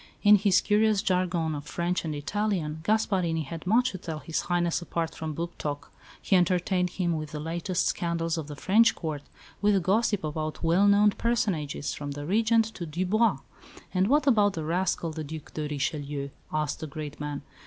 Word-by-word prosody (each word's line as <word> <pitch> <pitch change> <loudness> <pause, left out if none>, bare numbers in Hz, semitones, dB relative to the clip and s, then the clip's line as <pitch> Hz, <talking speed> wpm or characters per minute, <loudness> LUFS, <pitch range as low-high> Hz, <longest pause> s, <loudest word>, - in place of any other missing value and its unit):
In 210 0 +8
his 195 -2 +3
curious 210 -1 +2
jargon 180 -4 0
of 145 -1 -5
French 175 +1 -1
and 155 -2 -3
Italian, 160 -1 -2
Gasparini 180 -4 +1
had 165 +4 -8
much 245 +5 +3
to 185 - -7
tell 165 -3 -5
His 160 +1 -3
Highness 175 -1 0
apart 170 -1 -3
from 155 -2 -5
book 170 +2 -4
talk. 145 -1 -4 0.3
He 195 - +1
entertained 180 0 +2
him 175 -2 -1
with 155 -1 -4
the 150 - -4
latest 170 +3 -1
scandals 165 -1 -1
of 160 -3 -4
the 150 - -7
French 220 +9 +4
Court; 155 -4 -4 0.4
with 205 -3 +3
gossip 205 0 +1
about 155 +1 -4
well 175 +5 +4
known 205 +1 +5
personages, 195 -13 -1
from 145 -1 -5
the 145 +1 -6
Regent 225 +5 +3
to 170 - -6
Dubois. 185 +8 +1 0.6
"And 190 +1 +2
what 295 +5 +3
about 210 -7 +4
that 160 -3 -4
rascal, 170 0 0
the 155 0 -5
Duc 155 +1 -8
de 155 -1 -3
Richelieu?" 145 -1 -3 0.2
asked 155 -1 -1
the 160 - -5
great 150 0 -7
man. 145 -1 -4
170 Hz, 185 wpm, -27 LUFS, 155-200 Hz, 0.6 s, In